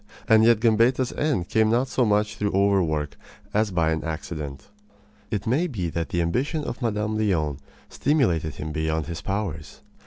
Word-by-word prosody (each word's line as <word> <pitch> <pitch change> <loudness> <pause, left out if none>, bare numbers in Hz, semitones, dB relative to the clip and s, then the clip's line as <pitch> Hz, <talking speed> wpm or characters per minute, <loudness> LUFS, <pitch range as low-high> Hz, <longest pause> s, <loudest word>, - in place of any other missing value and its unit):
And 110 -1 +6
yet 115 -1 +5
Gambetta's 120 +3 +3
end 140 - 0
came 110 -1 +3
not 120 +4 +2
so 130 -1 +1
much 105 0 +1
through 105 -1 -1
overwork 90 -7 +1 0.4
as 105 +1 +2
by 85 -4 +1
an 80 0 -1
accident. 75 -3 -6 0.6
It 105 -1 -3
may 140 +10 +1
be 95 - -3
that 85 0 -3
the 85 -1 0
ambition 135 - -1
of - - -5
Mme. 110 -2 -1
Leon 80 -10 0 0.3
stimulated 90 - +1
him 75 +2 -5
beyond 80 0 -1
his 85 -1 -6
powers. 85 -8 -4
100 Hz, 165 wpm, -24 LUFS, 80-115 Hz, 0.6 s, And